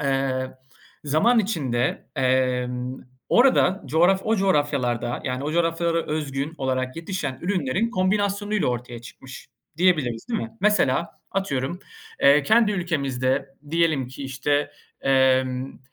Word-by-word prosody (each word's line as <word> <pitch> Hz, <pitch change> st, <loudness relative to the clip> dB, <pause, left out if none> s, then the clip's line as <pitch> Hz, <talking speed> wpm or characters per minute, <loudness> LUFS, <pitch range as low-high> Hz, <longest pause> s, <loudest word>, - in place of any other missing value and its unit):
eee, 135 Hz, -1 st, 0 dB, 0.5 s
zaman 180 Hz, -, +3 dB
içinde, 140 Hz, -, -1 dB
emm, 125 Hz, -1 st, 0 dB, 0.3 s
orada, 240 Hz, -6 st, +4 dB
coğraf 175 Hz, +5 st, +3 dB
o 225 Hz, 0 st, +2 dB
coğrafyalarda, 140 Hz, -, 0 dB
yani 130 Hz, +2 st, -3 dB
o 150 Hz, -, -2 dB
coğrafyalara 165 Hz, 0 st, 0 dB
özgün 150 Hz, 0 st, -3 dB
olarak 130 Hz, 0 st, -2 dB
yetişen 165 Hz, -6 st, -4 dB
ürünlerin 185 Hz, -, 0 dB
kombinasyonuyla 205 Hz, +1 st, 0 dB
ortaya 120 Hz, -1 st, -4 dB
çıkmış 130 Hz, +3 st, -12 dB, 0.3 s
diyebiliriz, 155 Hz, -11 st, +1 dB
değil 235 Hz, -, -1 dB
mi? 115 Hz, -, -5 dB
Mesela, 175 Hz, -7 st, +2 dB, 0.2 s
atıyorum, 175 Hz, -4 st, -2 dB, 0.4 s
eee, 140 Hz, +1 st, +6 dB
kendi 220 Hz, +5 st, +4 dB
ülkemizde, 135 Hz, -7 st, -1 dB, 0.2 s
diyelim 160 Hz, -6 st, +1 dB
ki 130 Hz, +2 st, -9 dB
işte, 140 Hz, +2 st, -1 dB, 0.3 s
emm, 130 Hz, -1 st, +1 dB
145 Hz, 115 wpm, -24 LUFS, 130-185 Hz, 0.5 s, eee